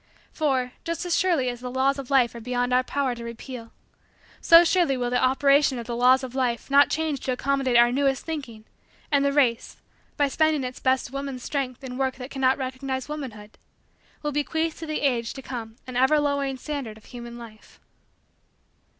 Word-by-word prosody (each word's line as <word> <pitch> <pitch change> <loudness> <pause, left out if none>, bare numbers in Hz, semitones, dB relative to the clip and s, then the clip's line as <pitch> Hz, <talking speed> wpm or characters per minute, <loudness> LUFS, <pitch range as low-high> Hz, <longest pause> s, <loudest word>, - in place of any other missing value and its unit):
For, 265 -5 0
just 335 +1 -3
as 350 - +1
surely 340 -8 +2
as 245 -1 -3
the 250 0 -6
laws 265 +2 +1
of 270 - -7
life 255 -4 +3
are 235 - -8
beyond 245 +1 -1
our 250 - +5
power 265 0 -1
to 235 -1 -8
repeal, 235 0 -8 0.7
so 335 +1 +8
surely 340 -6 +2
will 245 -1 -2
the 250 - +1
operation 275 +1 +3
of 235 - -5
the 235 0 -4
laws 255 +2 +4
of 255 -1 -6
life 255 -1 -1
not 285 +1 +6
change 310 -3 -1
to 260 - -3
accommodate 265 -1 +1
our 240 0 +6
newest 270 +1 0
thinking 250 -9 -6 0.5
and 285 -1 +3
the 280 - +2
race, 260 -5 +1 0.4
by 285 - +3
spending 310 0 +1
its 250 0 -5
best 260 -1 +1
woman 275 -1 -4
strength 255 0 -4
in 255 0 -6
work 265 -1 0
that 250 0 -9
cannot 265 -1 +2
recognize 260 0 -4
womanhood, 235 -9 -8 0.6
will 295 - -1
bequeath 320 +2 -1
to 325 - -6
the 310 - -2
ages 240 -5 0
to 270 - -9
come 225 -4 -6
an 255 - -8
ever 265 +4 +4
lowering 280 -2 -1
standard 260 -6 -5
of 220 - -19
human 240 -1 -9
life. 225 -2 -13
260 Hz, 195 wpm, -25 LUFS, 245-280 Hz, 0.7 s, so